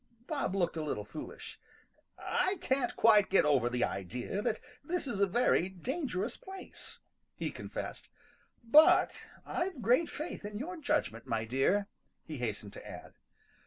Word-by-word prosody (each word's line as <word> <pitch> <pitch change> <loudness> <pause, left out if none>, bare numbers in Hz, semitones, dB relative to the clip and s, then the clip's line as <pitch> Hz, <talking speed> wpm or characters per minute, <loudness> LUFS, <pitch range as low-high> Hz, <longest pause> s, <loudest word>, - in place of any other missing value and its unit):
Bob 280 - -1
looked 175 -4 +1
a 160 - -2
little 145 -9 -2
foolish. 150 +9 -8 0.6
"I 380 +1 0
can't 260 -4 0
quite 210 -3 +6
get 195 - +5
over 135 -5 +3
the 125 0 0
idea 120 - -2
that 225 -1 0 0.2
this 345 0 -1
is 230 -6 -3
a 200 - +4
very 190 -3 +3
dangerous 220 - -3
place," 380 -1 -9 0.4
he - - -3
confessed. - - -6 0.5
"But 295 +7 +6 0.3
I've 350 -5 -2
great 250 +9 +4
faith 305 -5 -5
in 205 0 -5
your 345 +10 -5
judgment, 290 - -1
my 115 -2 0
dear," 135 - +2 0.4
he 155 - -7
hastened 105 -4 -3
to - - -9
add. - - -9
205 Hz, 150 wpm, -32 LUFS, -, 0.6 s, quite